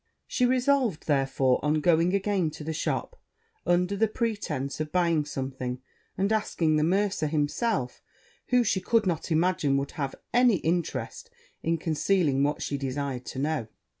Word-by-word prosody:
She 250 - +1
resolved, 255 - +1
therefore, 135 -3 +1
on 150 +1 +2
going 170 +3 +3
again 195 -4 +1
to - - -8
the 160 +1 -3
shop, - - -3 0.5
under 180 +3 +2
the 220 +3 +2
pretence 205 - -3
of 155 -1 -3
buying 170 -4 +2
something, 130 -3 -4 0.4
and 200 +3 +1
asking 165 -7 +1
the 150 - +2
mercer 190 -1 +1
himself, 150 - -1 0.5
who 250 -1 +4
she 205 -4 0
could 230 0 +2
not 175 -2 -1
imagine 160 -4 +2
would 140 0 -2
have 140 -3 -4 0.2
any 245 -2 +5
interest 175 - -2 0.3
in 165 +1 0
concealing 160 -2 +1
what 145 +1 0
she 140 - -2
desired 135 -1 -3
to - - -6
know. 145 -4 -1
160 Hz, 155 wpm, -27 LUFS, 145-200 Hz, 0.5 s, any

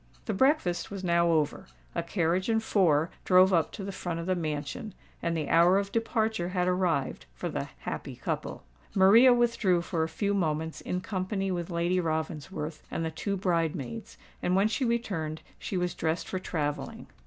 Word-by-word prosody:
The 220 - -1
breakfast 260 - +2
was 195 -2 -6
now 170 -1 +3
over; 155 -3 +1 0.3
a 170 - 0
carriage 170 +2 0
and 225 0 +2
four 165 -7 +3
drove 185 +1 +6
up 165 -3 +2
to 205 - -6
the 195 - -4
front 175 -3 -4
of 165 - -4
the 185 - +1
mansion; 155 +4 -4 0.3
and 170 -1 0
the 155 -3 -2
hour 170 +3 +5
of 200 0 -1
departure 220 -5 0
had 180 -1 0
arrived 180 - 0
for - - -4
the - - -4
"happy - - -5
couple." - - -4 0.3
Maria 215 +7 +7
withdrew 230 -7 +2
for 170 -1 -2
a 160 - 0
few 200 +6 -1
moments 160 -4 -1
in 180 - -3
company 195 0 -2
with 175 -1 -3
Lady 170 +1 +1
Ravensworth 155 -1 -3
and 165 - -2
the 160 - -2
two 200 +5 -2
bridemaids 170 - -2 0.2
and 180 - +1
when 195 +2 +4
she 230 +5 -1
returned 185 -10 -2 0.2
she 190 - -3
was 180 -1 0
dressed 160 +1 -1
for 185 - -3
travelling. 150 -5 -3
180 Hz, 180 wpm, -29 LUFS, 160-195 Hz, 0.3 s, Maria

